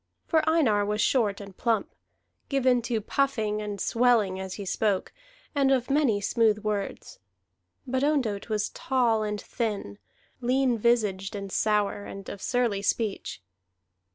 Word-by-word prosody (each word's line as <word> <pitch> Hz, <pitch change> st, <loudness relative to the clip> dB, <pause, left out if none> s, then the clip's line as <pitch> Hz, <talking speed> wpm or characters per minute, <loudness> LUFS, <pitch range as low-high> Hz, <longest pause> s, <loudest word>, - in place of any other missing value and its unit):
For 320 Hz, -2 st, +3 dB
Einar 250 Hz, -11 st, +3 dB
was 210 Hz, +1 st, -1 dB
short 210 Hz, -3 st, +2 dB
and 200 Hz, -2 st, -10 dB
plump, 225 Hz, -2 st, 0 dB, 0.6 s
given 255 Hz, -3 st, +3 dB
to 230 Hz, -2 st, -2 dB
puffing 215 Hz, -4 st, 0 dB
and 205 Hz, -1 st, -5 dB
swelling 225 Hz, -6 st, +2 dB
as 190 Hz, 0 st, -5 dB
he 200 Hz, -, -6 dB
spoke, 195 Hz, 0 st, 0 dB, 0.4 s
and 280 Hz, -2 st, +3 dB
of 260 Hz, 0 st, +1 dB
many 275 Hz, -8 st, +3 dB
smooth 220 Hz, +1 st, +2 dB
words; 205 Hz, -2 st, -3 dB, 0.7 s
but 260 Hz, +1 st, -1 dB
Ondott 250 Hz, -9 st, 0 dB
was 210 Hz, -1 st, 0 dB
tall 240 Hz, -4 st, +1 dB
and 210 Hz, -1 st, -2 dB
thin, 205 Hz, -, -4 dB, 0.4 s
lean 255 Hz, 0 st, +2 dB
visaged 210 Hz, -4 st, +1 dB
and 195 Hz, -1 st, -6 dB
sour, 205 Hz, -1 st, +1 dB
and 195 Hz, 0 st, -8 dB
of 200 Hz, -, -7 dB
surly 240 Hz, -5 st, 0 dB
speech. 205 Hz, -, -2 dB
215 Hz, 140 wpm, -27 LUFS, 205-250 Hz, 0.7 s, For